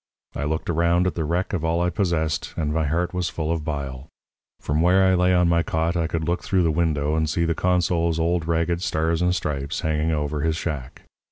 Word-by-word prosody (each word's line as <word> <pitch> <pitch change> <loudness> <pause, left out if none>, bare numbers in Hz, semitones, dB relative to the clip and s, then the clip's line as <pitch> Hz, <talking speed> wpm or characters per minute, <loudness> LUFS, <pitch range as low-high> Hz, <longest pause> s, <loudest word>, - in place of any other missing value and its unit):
I 75 - -2
looked 80 +1 -2
around 85 +1 +2
at 90 - 0
the 80 - -2
wreck 90 +6 -1
of 85 -5 -1
all 80 +1 +1
I 90 0 +1
possessed, 80 -5 -1
and 75 -2 -1
my 80 -1 0
heart 85 +5 -1
was 90 -2 -1
full 80 0 -3
of 80 -2 -1
bile. 70 -3 -5 0.5
From 75 +2 -1
where 90 +3 +4
I 95 - +4
lay 90 0 +3
on 90 -1 +4
my 85 0 +3
cot 80 +1 -1
I 85 -2 0
could 80 -1 -2
look 85 +2 0
through 95 -2 +1
the 80 - +2
window 75 -2 0
and 80 -1 0
see 85 +3 0
the 85 - +1
consul's 85 -2 +1
old 85 0 0
ragged 85 +1 0
Stars 80 -1 0
and 90 0 +2
Stripes 70 -5 -3
hanging 80 0 0
over 75 -1 -1
his 80 +1 +1
shack. 75 -7 -5
80 Hz, 230 wpm, -23 LUFS, 80-85 Hz, 0.5 s, where